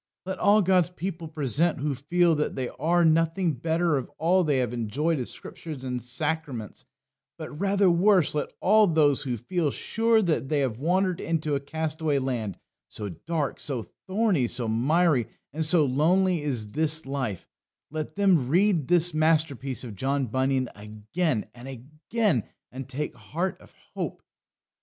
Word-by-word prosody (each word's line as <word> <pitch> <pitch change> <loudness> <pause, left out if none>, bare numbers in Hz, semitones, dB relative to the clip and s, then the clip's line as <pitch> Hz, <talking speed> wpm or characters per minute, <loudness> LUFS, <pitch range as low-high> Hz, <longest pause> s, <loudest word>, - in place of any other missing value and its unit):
Let 190 0 -4
all 210 0 +5
God's 180 -2 +3
people 180 -2 -5
present 155 +2 0
who 145 +1 -1
feel 170 +6 +2
that 150 -1 -1
they 130 -2 -2
are 170 +4 +1
nothing 165 +2 +2
better 160 +3 +1
of 130 - -4
all 180 +3 +3
they 150 -4 +1
have 125 -2 0
enjoyed 135 +8 -1
of 125 - -4
Scriptures 150 -6 -8
and 125 -1 -3
sacraments, 130 -3 -4 0.5
but - - -7
rather 195 +5 +1
worse; 180 -1 +4
let 150 - -2
all 215 +2 +5
those 150 -5 +3
who 125 -4 -2
feel 160 - -1
sure 225 +8 +1
that 155 -6 0
they 150 -2 +1
have 125 -4 -2
wandered 180 +4 +1
into 155 -2 -1
a 140 - +1
castaway 155 +1 -2
land, 120 -8 -2 0.3
so 105 -2 -5
dark, 150 - -3
so 130 -6 -3 0.2
thorny, 190 - +2
so 120 0 -2
miry, 135 +4 +2 0.3
and 160 +1 -1
so 155 -1 +4
lonely 170 +6 +2
is 120 -8 -2
their 155 +5 +1 0.2
life 130 -9 -4 0.4
let 155 -1 -5
them 185 -10 +3
read 175 -3 +3
this 175 -1 +4
masterpiece 155 -5 +1
of 115 -5 -7
John 135 +5 0
Bunyan 130 +2 0
again 110 +7 -2
and 125 +2 -11
again 150 - -2 0.3
and 130 +1 -8
take 145 +3 -3
heart 180 +4 -4
of - - -19 0.2
hope. - - -5
155 Hz, 160 wpm, -26 LUFS, 130-175 Hz, 0.5 s, all